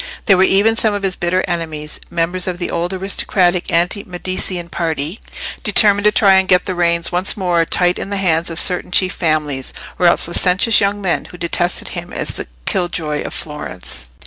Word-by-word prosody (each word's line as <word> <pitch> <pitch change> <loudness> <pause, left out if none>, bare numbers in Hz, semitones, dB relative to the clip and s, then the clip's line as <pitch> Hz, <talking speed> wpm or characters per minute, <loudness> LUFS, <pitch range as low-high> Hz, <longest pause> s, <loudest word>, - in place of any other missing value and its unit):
There 195 - +5
were 185 - +2
even 200 +4 +4
some 220 -2 +1
of 200 - -4
his 190 -2 +1
bitter 180 +2 0
enemies: 160 -3 -4
members 175 +2 -1
of 180 -1 -2
the 175 - -4
old 170 +2 -2
aristocratic 185 -1 0
anti 175 +4 +1
Medicean 180 -1 -4
party—determined 175 +5 0
to 210 - +6
try 195 -3 +5
and 190 - 0
get 180 -1 +3
the 185 - -2
reins 170 -1 +1
once 180 +3 0
more 175 -3 +1
tight 180 +1 +1
in - - -5
the 200 - -2
hands 170 -3 +1
of 165 0 -2
certain 180 -1 +1
chief 185 0 +3
families; 150 -5 -1 0.3
or 180 - +4
else 170 - +2
licentious 185 +6 +3
young 200 +1 0
men, 180 - -1
who 180 - -12
detested 175 +1 0
him - - -7
as - - -2
the - - -5 0.2
killjoy 160 -5 -1
of - - -6
Florence. 90 - -7
180 Hz, 190 wpm, -17 LUFS, 170-190 Hz, 0.3 s, to